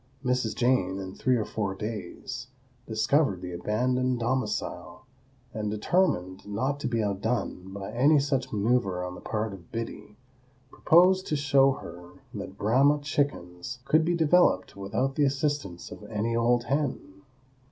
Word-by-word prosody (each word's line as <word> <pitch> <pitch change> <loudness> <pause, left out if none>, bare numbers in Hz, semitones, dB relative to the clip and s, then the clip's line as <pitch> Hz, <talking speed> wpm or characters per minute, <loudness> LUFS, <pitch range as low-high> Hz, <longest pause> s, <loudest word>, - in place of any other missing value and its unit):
Mrs. 125 -3 0
Jane, 120 -7 +2
in 95 -1 -6
three 130 +4 +1
or 110 -3 0
four 100 -3 -3
days, 110 +5 -6 0.4
discovered 110 - +1
the 90 - -5
abandoned 125 +7 0
domicile, 130 +1 -3 0.5
and, 105 -1 -2
determined 105 - 0
not 130 +8 -1
to 135 - -2
be 115 -3 0
outdone 100 -2 -2
by 100 +1 -6
any 140 +7 +4
such 140 -2 0
maneuver 105 -4 +1
on 90 - -5
the - - -10
part 110 -1 -2
of 90 -4 -13
Biddy, 115 -2 -6 0.5
proposed 185 +3 +4
to 150 - 0
show 140 -2 +4
her 85 -5 -10 0.2
that - - -7
Brahma 135 +7 +4
chickens 125 - -2
could 155 +3 +4
be 175 +2 +1
developed 165 - +3
without 100 +7 -1
the 145 - +1
assistance 135 - -2
of - - -9
any 110 +2 -1
old 120 +1 +2
hen. 130 -8 -2
120 Hz, 145 wpm, -27 LUFS, 100-135 Hz, 0.5 s, any